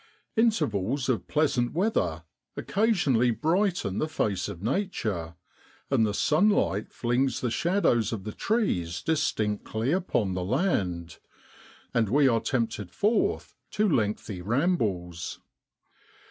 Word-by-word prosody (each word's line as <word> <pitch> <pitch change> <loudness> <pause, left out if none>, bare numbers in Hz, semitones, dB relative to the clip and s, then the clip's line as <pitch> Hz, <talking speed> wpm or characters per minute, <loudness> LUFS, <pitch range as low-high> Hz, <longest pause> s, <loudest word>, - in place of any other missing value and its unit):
Intervals 135 - +1
of 125 - 0
pleasant 140 -6 +1
weather 95 - 0 0.3
occasionally 175 - +2
brighten 160 - 0
the 155 - 0
face 105 - -1
of 85 - -8
Nature, 110 - -2 0.6
and 110 - +3
the 105 - -2
sunlight 155 - +2
flings 125 +1 0
the 125 - -1
shadows 145 - +2
of 110 -5 -4
the 105 - -5
trees 90 - -1
distinctly 110 -6 -1
upon 165 - 0
the 90 0 -2
land, 90 - -1 0.7
and 110 -3 +2
we 140 +4 +4
are 115 -3 +2
tempted 115 -7 -2
forth 210 - 0 0.2
to 215 0 +1
lengthy 105 - -1
rambles. 100 - -1
120 Hz, 115 wpm, -27 LUFS, -, 0.7 s, we